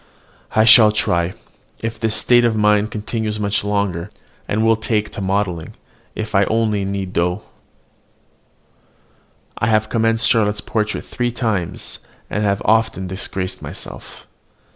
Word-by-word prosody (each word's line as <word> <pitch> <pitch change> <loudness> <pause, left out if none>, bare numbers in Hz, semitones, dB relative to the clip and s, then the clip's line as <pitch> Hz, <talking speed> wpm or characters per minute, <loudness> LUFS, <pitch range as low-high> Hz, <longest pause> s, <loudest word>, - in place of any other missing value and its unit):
I 110 - +5
shall 110 -1 +8
try, 90 -4 0 0.5
if 115 0 -4
this 110 -1 0
state 120 +3 +4
of 115 -2 +2
mind 105 0 +3
continues 110 0 -3
much 100 0 0
longer, 100 -3 -1 0.4
and 110 +2 0
will 115 0 +5
take 110 -1 -1
to - - -6
modelling, 95 -4 -2 0.4
if 110 0 -5
I 100 0 +4
only 110 -2 0
knead 95 -1 -4
dough. 90 +4 0 2.2
I 110 - +1
have 110 -1 +2
commenced 115 +1 +1
Charlotte's 105 -3 +2
portrait 110 -2 -2
three 120 -1 -2
times, 100 -7 -2 0.3
and 105 - -1
have 100 -1 +1
as - - -8
often 110 -3 +2
disgraced 95 0 -4
myself. - - -9
105 Hz, 140 wpm, -19 LUFS, 100-110 Hz, 2.2 s, shall